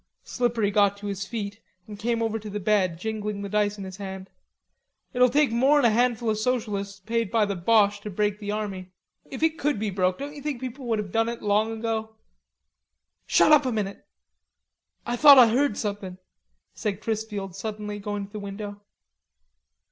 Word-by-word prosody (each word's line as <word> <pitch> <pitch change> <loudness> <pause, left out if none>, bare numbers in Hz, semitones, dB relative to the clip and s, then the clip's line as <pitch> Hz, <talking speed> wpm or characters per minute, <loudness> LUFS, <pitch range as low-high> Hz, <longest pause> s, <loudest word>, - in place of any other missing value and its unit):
Slippery 235 -4 0
got 200 -1 +3
to 205 - -10
his 195 -1 -4
feet 205 -3 -5 0.3
and 205 -1 -10
came 230 +1 0
over 225 0 -1
to 215 0 -8
the 210 +1 -4
bed, 190 -4 +1
jingling 210 +1 -4
the 200 - -5
dice 210 0 +1
in 200 - -6
his 190 0 -8
hand. 190 -1 -7 0.8
"It'll 250 0 +5
take 285 0 +3
more'n 265 +4 +4
a 235 - +5
handful 235 0 +1
o' - - +2
socialists 210 -3 -2
paid 230 +2 -1
by 225 -1 +2
the 200 -1 -3
Boches 205 +2 +3
to 210 - -7
break 210 +1 -1
the 205 -1 -6
army. 195 -3 -4 0.4
If 270 +3 -5
it 320 0 +1
could 295 -3 0
be 210 0 -2
broke, 185 -1 +1
don't 285 +1 -6
ye 290 - -9
think 290 -3 -3
people 260 0 -6
would 225 -2 +1
have 205 -3 -4
done 225 +2 +1
it 235 - -6
long 210 +2 +2
ago?" 220 -1 -3 1.1
"Shut - - +4
up 300 -1 +7
a - - 0
minute. 205 -3 -3 1.0
Ah 240 - -1
thought 285 +2 +9
Ah 250 - +10
heard 255 -1 +1
somethin'," 200 -3 -4 0.6
said 205 -4 -3
Chrisfield 210 -4 -4
suddenly, 210 0 -5
going 205 0 -4
to 200 - -18
the 210 - -6
window. 205 0 -7
210 Hz, 190 wpm, -25 LUFS, 200-235 Hz, 1.1 s, Ah